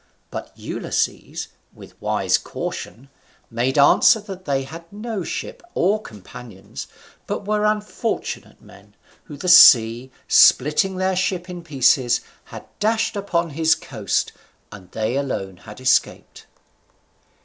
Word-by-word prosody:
But -, -, -7 dB
Ulysses, -, -, -3 dB, 0.3 s
with -, -, -13 dB
a -, -, -30 dB
wise -, -, 0 dB
caution, 135 Hz, +5 st, -7 dB, 0.4 s
made 125 Hz, +4 st, -1 dB
answer 145 Hz, +9 st, +5 dB
that 195 Hz, -3 st, -10 dB
they 135 Hz, -2 st, -1 dB
had 165 Hz, +5 st, -11 dB
no 210 Hz, -1 st, -5 dB
ship -, -, -6 dB
or 205 Hz, +4 st, +1 dB
companions, 105 Hz, -, -11 dB, 0.4 s
but -, -, -4 dB
were 210 Hz, 0 st, 0 dB
unfortunate 210 Hz, +2 st, -3 dB
men, -, -, -18 dB, 0.3 s
whom 150 Hz, -4 st, -10 dB
the 180 Hz, -, -6 dB
sea, 120 Hz, -7 st, +7 dB, 0.2 s
splitting 150 Hz, +8 st, +4 dB
their 185 Hz, 0 st, 0 dB
ship 180 Hz, -1 st, -2 dB
in 175 Hz, -1 st, -8 dB
pieces, 130 Hz, -5 st, +2 dB, 0.2 s
had -, -, -11 dB
dashed 220 Hz, +1 st, 0 dB
upon 175 Hz, -5 st, -1 dB
his 160 Hz, +2 st, +2 dB
coast, 110 Hz, -7 st, -3 dB, 0.4 s
and 95 Hz, -4 st, -13 dB
they 110 Hz, +5 st, -2 dB
alone 95 Hz, -9 st, -4 dB
had 105 Hz, +5 st, -13 dB
escaped. 130 Hz, -, 0 dB
155 Hz, 125 wpm, -21 LUFS, 125-190 Hz, 0.4 s, sea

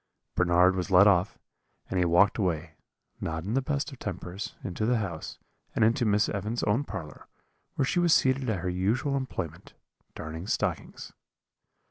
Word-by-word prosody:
"Bernard 90 Hz, +1 st, +4 dB
was 90 Hz, +1 st, -2 dB
let 95 Hz, +1 st, +7 dB
off, 95 Hz, -1 st, +3 dB, 0.5 s
and 95 Hz, -, -1 dB
he 90 Hz, -, +3 dB
walked 90 Hz, +6 st, +4 dB
away, 85 Hz, -4 st, -1 dB, 0.5 s
not 80 Hz, 0 st, -3 dB
in 100 Hz, +5 st, -3 dB
the 135 Hz, -, +2 dB
best 145 Hz, +3 st, -2 dB
of 135 Hz, -, -11 dB
tempers, 95 Hz, 0 st, -5 dB
into 95 Hz, +3 st, -4 dB
the 120 Hz, +2 st, +2 dB
house, 95 Hz, -7 st, -5 dB, 0.4 s
and 110 Hz, -, +4 dB
into 115 Hz, +2 st, +2 dB
Miss 105 Hz, +1 st, +3 dB
Evans's 105 Hz, +4 st, -3 dB
own 105 Hz, +7 st, +2 dB
parlour, 80 Hz, -, -8 dB, 0.5 s
where 135 Hz, -, +1 dB
she 175 Hz, +7 st, +1 dB
was 175 Hz, -1 st, +3 dB
seated 130 Hz, -3 st, +3 dB
at 100 Hz, -6 st, -1 dB
her 90 Hz, -, -3 dB
usual 110 Hz, +10 st, 0 dB
employment, 130 Hz, -2 st, -5 dB, 0.4 s
darning 80 Hz, +4 st, -6 dB
stockings. -, -, -3 dB
100 Hz, 165 wpm, -28 LUFS, 90-120 Hz, 0.5 s, let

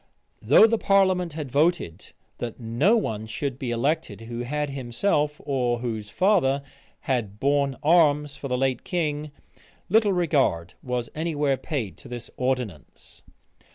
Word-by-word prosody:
Though -, -, +7 dB
the 225 Hz, 0 st, +2 dB
parliament 185 Hz, -4 st, +2 dB
had 150 Hz, -4 st, -6 dB
voted, 145 Hz, -, 0 dB, 0.3 s
that 120 Hz, 0 st, -5 dB
no 125 Hz, -, +2 dB
one 110 Hz, -, -3 dB
should 135 Hz, +3 st, -4 dB
be 130 Hz, -, -3 dB
elected 120 Hz, -, -1 dB
who 115 Hz, +1 st, -6 dB
had 145 Hz, +4 st, -2 dB
himself, 145 Hz, +4 st, 0 dB
or 125 Hz, -4 st, 0 dB
whose 110 Hz, -3 st, -4 dB
father, 140 Hz, -, +2 dB, 0.4 s
had 110 Hz, -6 st, -2 dB
borne 140 Hz, 0 st, +1 dB
arms 150 Hz, -3 st, +4 dB
for 140 Hz, -, -6 dB
the 125 Hz, -1 st, -1 dB
late 130 Hz, -2 st, 0 dB
king, 155 Hz, -4 st, -2 dB, 0.6 s
little 215 Hz, +1 st, +4 dB
regard 140 Hz, -, +1 dB
was 125 Hz, -2 st, -3 dB
any 160 Hz, +1 st, -3 dB
where 145 Hz, -2 st, +2 dB
paid 120 Hz, -, -4 dB
to -, -, -12 dB
this 120 Hz, -1 st, -7 dB
ordinance. 125 Hz, -, -4 dB
140 Hz, 145 wpm, -25 LUFS, 120-155 Hz, 0.6 s, Though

